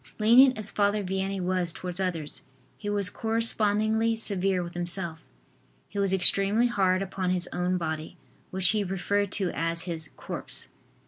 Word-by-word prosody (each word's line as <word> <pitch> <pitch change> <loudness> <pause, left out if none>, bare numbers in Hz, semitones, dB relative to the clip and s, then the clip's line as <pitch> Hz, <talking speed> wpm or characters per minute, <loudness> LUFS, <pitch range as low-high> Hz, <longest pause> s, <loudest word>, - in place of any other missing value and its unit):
Lenient 245 +4 +6
as 215 -1 -5
Father 205 0 +1
Vianney 190 +1 -2
was 180 -1 +1
towards 180 +1 -5
others, 170 -5 -2 0.3
he 205 - -6
was 205 -2 +1
correspondingly 220 0 0
severe 195 -4 +1
with 170 0 -8
himself. 175 -1 -1 0.7
He 200 - -5
was 195 -1 +2
extremely 195 +4 +4
hard 195 -5 +1
upon 190 -1 -3
his 180 -1 -1
own 180 +1 0
body, 160 -2 -5 0.3
which 185 -1 +2
he 215 -2 +1
referred 200 +1 -1
to 190 -3 0
as 165 0 -2
his 160 -4 -2
"corpse." - - -2
190 Hz, 150 wpm, -27 LUFS, 180-205 Hz, 0.7 s, Lenient